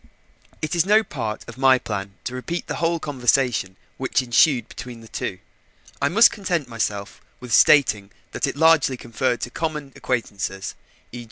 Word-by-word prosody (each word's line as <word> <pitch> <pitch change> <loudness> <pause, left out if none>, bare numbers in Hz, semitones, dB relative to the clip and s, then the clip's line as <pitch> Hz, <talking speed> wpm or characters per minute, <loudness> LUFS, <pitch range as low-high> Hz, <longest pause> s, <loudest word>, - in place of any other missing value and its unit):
It 155 - -2
is 170 - +4
no 210 +4 +4
part 115 - -5
of - - -10
my 135 -1 +6
plan 100 -4 -5
to 125 - -5
repeat 165 +7 -4
the - - -4
whole 170 0 0
conversation 125 -8 0 0.2
which 130 0 0
ensued 125 +2 +3
between 120 -2 -9
the 115 - -13
two. - - -4 0.6
I 140 - +2
must 225 +8 +6
content 175 - -2
myself 105 -4 -4 0.2
with 125 -3 -6
stating 110 -11 +5 0.2
that - - -1
it - - -3
largely 160 -5 +4
referred 120 +1 -1
to 120 - -4
common 150 -3 -4
acquaintances, 100 -5 -3 0.4
e. 120 - -7
130 Hz, 165 wpm, -22 LUFS, 115-155 Hz, 0.6 s, my